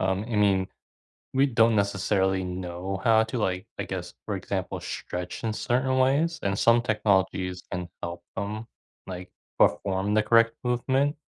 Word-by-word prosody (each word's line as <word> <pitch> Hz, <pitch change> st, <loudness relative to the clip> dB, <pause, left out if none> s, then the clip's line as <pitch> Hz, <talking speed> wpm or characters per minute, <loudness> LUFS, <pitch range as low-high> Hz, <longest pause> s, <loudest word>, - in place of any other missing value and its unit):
um, 95 Hz, +2 st, 0 dB
I 115 Hz, -, -3 dB
mean, 100 Hz, -2 st, +3 dB, 0.7 s
we 135 Hz, -, +5 dB
don't 115 Hz, -4 st, +4 dB
necessarily 100 Hz, -1 st, +1 dB
know 90 Hz, +1 st, -4 dB
how 110 Hz, -1 st, +5 dB
to, 110 Hz, +3 st, -4 dB
like, 95 Hz, -4 st, -1 dB
I -, -, -2 dB
guess, -, -, -5 dB
for -, -, -2 dB
example, -, -, -3 dB
stretch 90 Hz, +4 st, -5 dB
in 110 Hz, -1 st, 0 dB
certain 130 Hz, +3 st, +1 dB
ways, 155 Hz, +5 st, +2 dB
and 100 Hz, 0 st, 0 dB
some 115 Hz, +2 st, +5 dB
technologies 95 Hz, -5 st, +1 dB
can 90 Hz, -1 st, -4 dB
help 85 Hz, 0 st, -5 dB
them, 105 Hz, +2 st, -4 dB, 0.4 s
like, 90 Hz, 0 st, -7 dB, 0.3 s
perform 95 Hz, +6 st, +2 dB
the 110 Hz, -, +4 dB
correct 115 Hz, 0 st, +4 dB
movement. 130 Hz, +4 st, +1 dB
100 Hz, 155 wpm, -27 LUFS, 95-115 Hz, 0.7 s, we